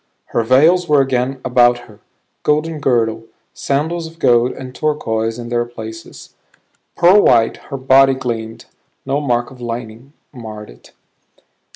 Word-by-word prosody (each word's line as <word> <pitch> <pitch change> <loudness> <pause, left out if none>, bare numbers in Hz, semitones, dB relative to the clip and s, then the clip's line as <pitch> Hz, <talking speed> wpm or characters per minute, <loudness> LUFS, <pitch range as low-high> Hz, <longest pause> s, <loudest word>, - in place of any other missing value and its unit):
Her - - +2
veils 155 +10 +3
were 150 -1 +4
again 130 0 0
about 120 -1 +3
her; 105 -1 -17 0.4
golden 155 +1 0
girdle, 115 -4 0 0.3
sandals 160 +4 -2
of 165 +1 -15
gold 120 -5 +3
and 130 -1 -9
turquoise 115 -7 -2
in 120 -1 -7
their 120 0 0
places. 110 -2 -10 0.6
Pearl 185 +4 +5
white 115 - +3
her 140 - -4
body 135 +1 +4
gleamed; 115 -3 -5 0.4
no 140 +2 -1
mark 120 -2 -1
of 125 -2 -14
lightning 120 +2 -7 0.2
marred 110 -4 -9
it. - - -19
125 Hz, 140 wpm, -17 LUFS, 115-140 Hz, 0.6 s, Pearl